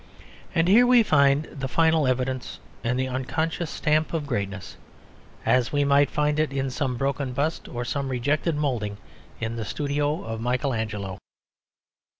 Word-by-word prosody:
And 165 Hz, +1 st, +3 dB
here 235 Hz, +6 st, +6 dB
we 245 Hz, -2 st, +6 dB
find 140 Hz, -5 st, +4 dB
the 135 Hz, -2 st, -4 dB
final 160 Hz, 0 st, +3 dB
evidence 130 Hz, 0 st, -2 dB, 0.2 s
and 125 Hz, +1 st, 0 dB
the 130 Hz, 0 st, 0 dB
unconscious 155 Hz, +6 st, -2 dB
stamp 155 Hz, +2 st, 0 dB
of 155 Hz, -3 st, -2 dB
greatness, 100 Hz, -, -4 dB, 0.7 s
as 125 Hz, -2 st, +3 dB
we 145 Hz, -1 st, +2 dB
might 140 Hz, 0 st, +4 dB
find 150 Hz, 0 st, 0 dB
it 155 Hz, -2 st, +1 dB
in 135 Hz, -1 st, -2 dB
some 130 Hz, -2 st, -2 dB
broken 135 Hz, 0 st, -1 dB
bust 145 Hz, +5 st, -1 dB
or 120 Hz, 0 st, -4 dB
some 140 Hz, +1 st, -2 dB
rejected 145 Hz, +6 st, 0 dB
moulding 120 Hz, -9 st, -1 dB, 0.4 s
in 115 Hz, +1 st, -3 dB
the 115 Hz, -, -3 dB
studio 145 Hz, +5 st, -1 dB
of 115 Hz, 0 st, -5 dB
Michael 125 Hz, +3 st, 0 dB
Angelo. 105 Hz, -4 st, -4 dB
140 Hz, 155 wpm, -25 LUFS, 125-150 Hz, 0.7 s, here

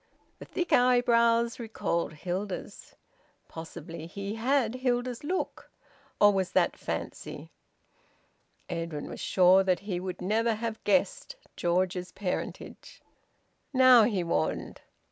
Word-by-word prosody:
The -, -, -9 dB
thick 350 Hz, -2 st, -2 dB
eyebrows 235 Hz, -1 st, +3 dB
recalled 190 Hz, -8 st, -2 dB
Hilda's. 185 Hz, +5 st, -5 dB, 0.5 s
Possibly 165 Hz, 0 st, -8 dB
he 200 Hz, +3 st, -5 dB
had 240 Hz, +1 st, +1 dB
Hilda's 250 Hz, -1 st, -1 dB
look! 365 Hz, +5 st, -3 dB, 0.5 s
Or 205 Hz, 0 st, +6 dB
was 190 Hz, -2 st, -1 dB
that -, -, +2 dB
fancy? -, -, -6 dB, 1.2 s
Edwin 165 Hz, -3 st, -4 dB
was -, -, -8 dB
sure 185 Hz, +1 st, +5 dB
that 185 Hz, -1 st, +1 dB
he 195 Hz, -3 st, -3 dB
would 185 Hz, 0 st, -5 dB
never 220 Hz, +4 st, +1 dB
have 220 Hz, 0 st, -5 dB
guessed 280 Hz, -, +1 dB, 0.2 s
George's 180 Hz, +1 st, 0 dB
parentage. 190 Hz, -3 st, -5 dB, 0.7 s
"Now!" 255 Hz, -2 st, +7 dB
he 200 Hz, -6 st, 0 dB
warned. 170 Hz, -, -2 dB
205 Hz, 110 wpm, -28 LUFS, 180-245 Hz, 1.2 s, Now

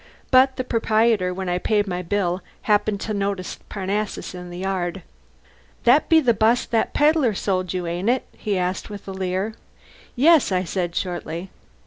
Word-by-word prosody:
But 260 Hz, +1 st, +5 dB
the 255 Hz, -, -2 dB
proprietor, 220 Hz, -5 st, +2 dB
when 190 Hz, +1 st, -4 dB
I 180 Hz, 0 st, 0 dB
paid 205 Hz, +1 st, +1 dB
my 180 Hz, -2 st, -3 dB
bill, 180 Hz, 0 st, -1 dB, 0.2 s
happened 210 Hz, -1 st, +2 dB
to 215 Hz, -, -3 dB
notice 200 Hz, -2 st, -3 dB
Parnassus 200 Hz, +1 st, -3 dB
in 180 Hz, 0 st, -8 dB
the 175 Hz, -, -8 dB
yard. 185 Hz, -1 st, -2 dB, 0.8 s
"That's 260 Hz, +6 st, +5 dB
the 315 Hz, -8 st, +5 dB
bus 225 Hz, +3 st, +2 dB
that 225 Hz, -1 st, -1 dB
pedlar 295 Hz, -7 st, +3 dB
sold 185 Hz, -2 st, -1 dB
you, 180 Hz, -1 st, -3 dB
ain't 175 Hz, +5 st, -1 dB
it?" 255 Hz, +1 st, +1 dB
he 205 Hz, -3 st, -2 dB
asked 180 Hz, +3 st, -2 dB
with 205 Hz, -1 st, -9 dB
a -, -, -4 dB
leer. 190 Hz, +3 st, -2 dB, 0.6 s
"Yes," 300 Hz, -1 st, +5 dB
I 185 Hz, -1 st, +1 dB
said, 175 Hz, -1 st, -3 dB
shortly. 175 Hz, 0 st, -4 dB
195 Hz, 165 wpm, -23 LUFS, 180-225 Hz, 0.8 s, But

